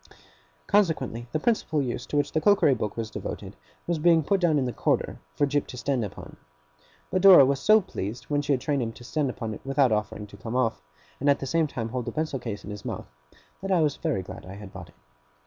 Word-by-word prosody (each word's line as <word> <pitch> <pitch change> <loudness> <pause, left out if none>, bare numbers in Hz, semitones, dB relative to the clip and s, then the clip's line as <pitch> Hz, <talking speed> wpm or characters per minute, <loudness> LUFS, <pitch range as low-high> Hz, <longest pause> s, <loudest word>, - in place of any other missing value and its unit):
Consequently, 160 - +1
the - - 0
principal 185 -7 +1
use 125 -4 -3
to 145 - -2
which 145 - +1
the 155 - 0
cookery 200 -5 +5
book 105 -3 -3
was 110 -1 -4
devoted, - - -6 0.3
was 170 -2 -1
being 165 0 +4
put 195 +6 +1
down 165 -4 +3
in 135 - +1
the 125 - -3
corner - - 0 0.2
for 145 - +3
Jip 145 0 0
to 125 - -9
stand 130 -2 -1
upon. 100 - -8 0.7
But 185 - +1
Dora 185 -8 +9
was 135 +1 +1
so 215 +7 +5
pleased, 115 - -5
when 145 -1 0
she 145 0 +1
had 130 - 0
trained 140 -1 0
him 115 -1 -3
to 120 - -13
stand 145 +2 -1
upon 115 -3 -4
it - - -9
without 135 -2 +2
offering 105 0 -2
to 100 0 -14
come 110 +5 -6
off, 115 -12 +1 0.4
and 140 - +2
at 140 - +5
the - - -5
same 160 +3 +1
time 115 -5 -4
to - - -13
hold 125 -1 -3
the - - -3
pencil 155 -3 -2
case 115 -4 -6
in 105 - -7
his 105 -1 -8
mouth, - - -5 0.6
that 195 0 -3
I 180 -3 +4
was 150 -2 0
very 145 - -1
glad - - -9
I 95 +1 -9
had 100 -1 -10
bought 90 -4 -9
it. - - -22
135 Hz, 250 wpm, -26 LUFS, 115-155 Hz, 0.7 s, Dora